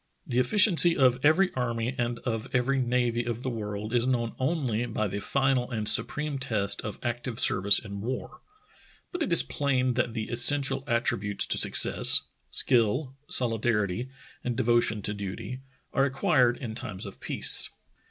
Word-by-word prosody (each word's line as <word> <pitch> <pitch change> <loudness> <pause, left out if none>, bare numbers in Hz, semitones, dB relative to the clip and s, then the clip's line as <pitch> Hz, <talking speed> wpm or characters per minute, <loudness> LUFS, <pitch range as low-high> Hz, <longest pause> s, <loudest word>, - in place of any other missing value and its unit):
The 125 - -1
efficiency 175 - +4
of 130 -2 +3
every 180 +6 +3
army 120 -1 -3
and 120 -2 -3
of 115 0 -3
every 135 +2 0
navy 120 -1 -1
of 120 +1 -5
the 130 - -3
world 105 -1 -6
is 120 0 +1
known 120 -3 -1
only 130 -5 -1
by 110 -2 -2
the 100 +1 -5
final 135 +2 -1
and 110 -4 -4
supreme 150 +3 0
test 105 -6 -1
of 105 -2 -7
active 120 0 -4
service 100 +1 +4
in 100 -2 -7
war, 125 +4 -6 0.7
but 355 - -6
it 195 - -2
is 170 - +5
plain 130 -3 -1
that 120 -1 -2
the 110 -2 -4
essential 135 +3 +2
attributes 110 -4 0
to - - +3
success - - +5
— - - -46
skill, 130 +3 +1
solidarity, 115 -1 0 0.3
and 120 -2 -4
devotion 115 -3 0
to 105 - -2
duty 100 +5 -7 0.2
— - - -41
are 135 - +2
acquired 130 -2 +1
in 115 -4 -7
times 105 -1 -5
of 100 - -10
peace. - - +4
120 Hz, 165 wpm, -26 LUFS, 110-130 Hz, 0.7 s, is